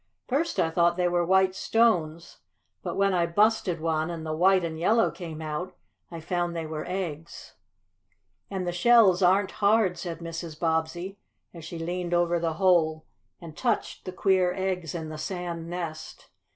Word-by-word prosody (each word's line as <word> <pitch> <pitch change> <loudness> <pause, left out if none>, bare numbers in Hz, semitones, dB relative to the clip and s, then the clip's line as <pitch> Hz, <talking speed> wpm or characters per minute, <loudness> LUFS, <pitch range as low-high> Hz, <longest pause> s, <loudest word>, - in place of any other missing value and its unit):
First 280 - -1
I 165 -2 +2
thought 170 +1 +2
they 180 -1 +2
were 175 0 +1
white 190 +1 +3
stones, 175 -7 0 0.4
but - - -4
when 195 -1 +2
I 170 -2 +2
busted 205 -1 +2
one, 160 0 -1
and 165 -2 -6
the 155 - -3
white 185 +2 +4
and 160 -1 -4
yellow 225 +7 +3
came 160 -3 -8
out, 155 +4 -5 0.3
I 170 - -7
found 175 +1 -2
they 165 -1 -3
were 155 -1 -5
eggs." 170 -4 -6 1.0
"And 190 -2 -3
the 175 - -1
shells 195 0 +5
aren't 190 +2 +3
hard," 205 -2 +3
said 170 -3 -5
Mrs. 165 -1 -7
Bobbsey, 170 +4 -2 0.3
as 170 -2 -10
she 165 +1 -7
leaned 175 +1 -2
over 175 0 +2
the 165 -1 -1
hole 160 -3 +2 0.3
and 165 -3 -11
touched 235 +2 -2
the 185 - -4
queer 185 -1 +2
eggs 185 -4 -3
in 160 -2 -5
the 155 0 -7
sand 170 -1 -5
nest. 170 -3 -7
175 Hz, 170 wpm, -27 LUFS, 165-190 Hz, 1.0 s, shells